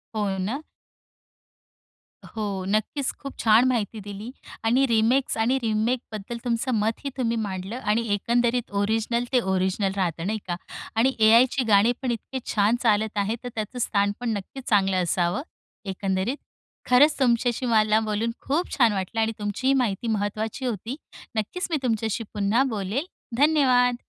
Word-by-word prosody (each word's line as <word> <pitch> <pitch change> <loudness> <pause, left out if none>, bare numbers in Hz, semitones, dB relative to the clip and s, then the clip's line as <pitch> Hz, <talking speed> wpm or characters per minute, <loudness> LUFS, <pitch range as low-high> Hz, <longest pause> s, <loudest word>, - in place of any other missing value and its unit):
हो 210 -1 0 0.2
ना? 270 +7 -3 1.6
हो. 205 -4 -4
नक्कीच. 215 +7 0
खूप 275 -1 -8
छान 225 +3 +5
माहिती 225 -3 -1
दिली 205 +4 -7 0.3
आणि 250 +4 +4
रिमेक्स 235 +3 +2
आणि 235 +4 +2
रीमेकबद्दल 225 0 -2
तुमचं 240 +2 0
मत 220 +1 0
ही - - 0
तुम्ही 235 -3 0
मांडलं 200 +2 -4
आणि 230 0 0
एकंदरीत 240 +3 0
ओरिजिनल 225 +3 0
ते 255 - +5
ओरिजिनल 190 +1 0
राहतं 175 -3 -1
नाही 215 +1 -1
का? 175 - -1 0.4
आणि 250 +4 +3
एआयची 235 +4 +5
गाणी 210 +2 +5
पण 255 -2 -1
इतके 240 +3 -4
छान 210 +2 +3
चालत 215 -1 +2
आहे. 205 +2 0
तर 245 - -4
त्याचं 220 +3 -4
स्थान 200 -3 +1
पण 245 -1 -2
नक्कीच 255 +7 -9
चांगलं 195 -3 +3
असावं, 175 +6 0 0.4
एकंदरीत. 195 +5 -1 0.5
खरंच 285 +5 +6
तुमच्याशी 245 -1 +2
मला 215 -2 +3
बोलून 220 +1 -1
खूप 315 +6 -1
छान 235 -5 +5
वाटलं 195 +3 -3
आणि 220 0 +1
तुमची 210 +5 -2
ही 270 - +5
माहिती 240 -4 0
महत्त्वाची 215 +3 -2
होती. 235 +1 -3 0.4
नक्कीच 220 - -2
मी 315 - +2
तुमच्याशी 225 -2 -1
पुन्हा 210 +5 +2
बोलेल, 215 - -2 0.3
धन्यवाद! 260 -4 +4
225 Hz, 150 wpm, -25 LUFS, 205-245 Hz, 1.6 s, खरंच